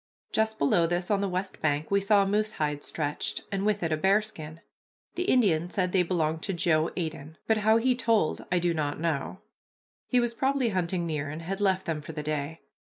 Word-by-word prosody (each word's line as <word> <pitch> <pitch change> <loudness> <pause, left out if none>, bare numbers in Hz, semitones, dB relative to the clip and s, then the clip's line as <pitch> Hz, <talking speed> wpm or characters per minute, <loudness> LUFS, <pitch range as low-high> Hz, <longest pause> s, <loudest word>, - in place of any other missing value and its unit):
Just 220 0 +1
below 165 +4 +3
this, 175 +3 -1
on 200 -1 +2
the 200 - 0
west 185 +1 -3
bank, 150 +1 -1
we 200 0 +3
saw 200 0 +4
a - - -1
moose 210 +2 0
hide 150 -1 -2
stretched, 150 -1 -3
and 195 +1 -1
with 210 -3 +1
it 165 - 0
a 155 - +1
bearskin. 190 -4 0 0.5
The 360 - -2
Indian 180 - +3
said 185 -1 -1
they 185 - +3
belonged 160 -3 0
to 195 - -2
Joe 160 -1 +2
Aitteon, 160 -3 -4
but 220 - +2
how 220 +1 +4
he 250 +3 +3
told 230 -8 +1
I 180 - +3
do 175 -1 +1
not 150 -2 -2
know. 165 +2 -2 0.7
He 250 - +3
was 240 -1 0
probably 265 0 +1
hunting 180 -2 -1
near 150 -3 -2
and 155 +3 -6
had 195 +4 -4
left 190 -2 +2
them 160 -2 -2
for 160 +2 -8
the 150 -1 -5
day. 150 +1 -3
180 Hz, 215 wpm, -28 LUFS, 155-205 Hz, 0.7 s, saw